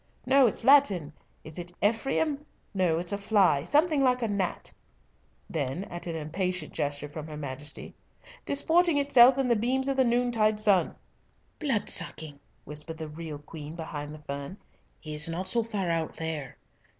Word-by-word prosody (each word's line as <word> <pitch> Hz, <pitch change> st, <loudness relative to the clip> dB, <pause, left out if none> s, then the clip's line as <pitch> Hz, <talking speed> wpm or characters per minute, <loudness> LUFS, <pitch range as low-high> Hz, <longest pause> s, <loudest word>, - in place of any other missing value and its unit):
"No, 265 Hz, 0 st, +5 dB
it's 225 Hz, -, -1 dB
Latin. 210 Hz, -, +5 dB, 0.3 s
Is 155 Hz, +2 st, -7 dB
it 175 Hz, 0 st, -6 dB
Ephraim? 270 Hz, +7 st, 0 dB, 0.3 s
No; 180 Hz, -4 st, +2 dB
it's 175 Hz, +1 st, -2 dB
a 200 Hz, -, -2 dB
fly, 200 Hz, -8 st, +3 dB
something 300 Hz, -, +3 dB
like 250 Hz, -1 st, +2 dB
a -, -, +1 dB
gnat" 200 Hz, -3 st, -2 dB, 0.7 s
(then 145 Hz, +3 st, -3 dB
at 175 Hz, 0 st, -6 dB
an 165 Hz, -, -3 dB
impatient 170 Hz, +2 st, -3 dB
gesture 145 Hz, 0 st, -2 dB
from 150 Hz, +1 st, -8 dB
her 155 Hz, -1 st, -7 dB
Majesty) 145 Hz, +1 st, -6 dB, 0.5 s
"disporting 325 Hz, +3 st, +3 dB
itself 265 Hz, -2 st, +6 dB
in 270 Hz, -2 st, +1 dB
the 240 Hz, -, +3 dB
beams 255 Hz, +5 st, 0 dB
of 275 Hz, -1 st, 0 dB
the 265 Hz, -, +5 dB
noontide 235 Hz, -3 st, +2 dB
sun." 205 Hz, -4 st, +3 dB, 0.6 s
"Blood 270 Hz, -9 st, 0 dB
sucking," 150 Hz, -3 st, -2 dB, 0.2 s
whispered 150 Hz, +2 st, -4 dB
the 160 Hz, -1 st, -6 dB
real 155 Hz, -1 st, -7 dB
Queen 150 Hz, +1 st, -9 dB
behind 150 Hz, -3 st, -6 dB
the 155 Hz, -, -8 dB
fern. 140 Hz, +6 st, -6 dB, 0.4 s
"He 155 Hz, -, -8 dB
is 150 Hz, +2 st, -3 dB
not 180 Hz, +3 st, -3 dB
so 235 Hz, +5 st, +2 dB
far 205 Hz, -6 st, -2 dB
out 165 Hz, -1 st, -2 dB
there. 160 Hz, -5 st, -5 dB
180 Hz, 165 wpm, -28 LUFS, 155-245 Hz, 0.7 s, itself